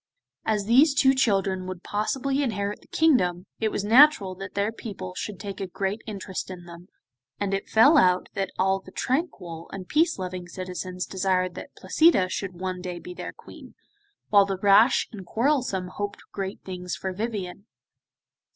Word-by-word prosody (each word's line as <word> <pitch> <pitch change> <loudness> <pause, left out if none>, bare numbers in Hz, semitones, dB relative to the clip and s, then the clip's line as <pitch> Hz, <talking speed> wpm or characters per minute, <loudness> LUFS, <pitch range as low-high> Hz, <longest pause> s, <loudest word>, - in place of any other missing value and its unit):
As 210 -2 0
these 275 +6 +5
two 265 -1 +5
children 195 -7 +1
would 185 -1 -7
possibly 265 +7 -1
inherit 205 -5 -2
the - - -22
kingdom, 185 - +2
it 220 - +1
was 205 - -3
natural 230 -3 +6
that 195 +1 -9
their 200 +2 0
people 195 -5 -7
should 195 +1 -6
take 200 -2 -6
a 195 - -2
great 195 +4 -3
interest 195 -3 -5
in 180 -2 -9
them, 170 +1 -12 0.5
and 200 -1 -1
it 195 - -3
fell 280 +8 +6
out 180 0 +3
that 195 -1 -2
all 190 +1 +2
the 190 - -14
tranquil 190 - -3
and 185 -2 -7
peace 315 +1 +2
loving 185 -1 -5
citizens 185 0 -5
desired 185 -1 0
that - - -10
Placida 315 - +3
should 190 -1 -4
one 185 -1 -3
day 180 -1 -5
be 180 +1 -9
their - - -6
Queen, - - -14 0.5
while 200 -1 +6
the 195 -1 -2
rash 205 +6 +5
and 205 -4 -8
quarrelsome 230 -4 0
hoped 205 +2 -5
great 195 0 -5
things 180 -1 -5
for 190 -1 -4
Vivien. 200 -1 -5
195 Hz, 170 wpm, -25 LUFS, 185-220 Hz, 0.5 s, natural